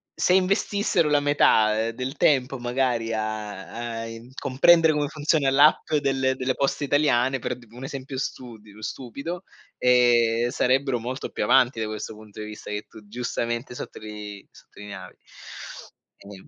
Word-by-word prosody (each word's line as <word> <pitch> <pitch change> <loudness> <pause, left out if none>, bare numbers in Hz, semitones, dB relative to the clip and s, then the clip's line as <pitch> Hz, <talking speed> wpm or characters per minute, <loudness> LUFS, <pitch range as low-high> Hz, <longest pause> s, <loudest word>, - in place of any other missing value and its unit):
Se 180 - +2
investissero 190 -3 +2
la 145 - +4
metà, 110 -6 +3
ehm, - - -3
del 130 +4 -5
tempo 135 -2 +2
magari 120 -2 0
a 110 +2 -4
a - - -5
in 115 +2 -10
comprendere 160 +5 +4
come 145 -1 -1
funziona 150 -2 +1
l'app 150 +4 +4
delle 135 -1 +1
delle 130 0 -1
poste 140 +1 0
italiane, 135 -2 +2
per 125 0 -3
un 125 +3 -10
esempio 135 0 -6
studi 115 -6 -6
stupido, 140 - -6 0.3
ehm, 120 -1 +4
sarebbero 130 +1 +1
molto 125 +3 -5
più - - -3
avanti 125 -2 +4
da 110 - 0
questo 110 0 -6
punto 105 -1 -13
di 105 - -5
vista 105 0 -8
che 105 0 -4
tu 105 -2 -15
giustamente 120 +2 -3
sottolii 105 -3 -8
sottolineavi. 100 -3 -11 1.1
Ehm 100 -1 -12
125 Hz, 145 wpm, -25 LUFS, 110-140 Hz, 1.1 s, la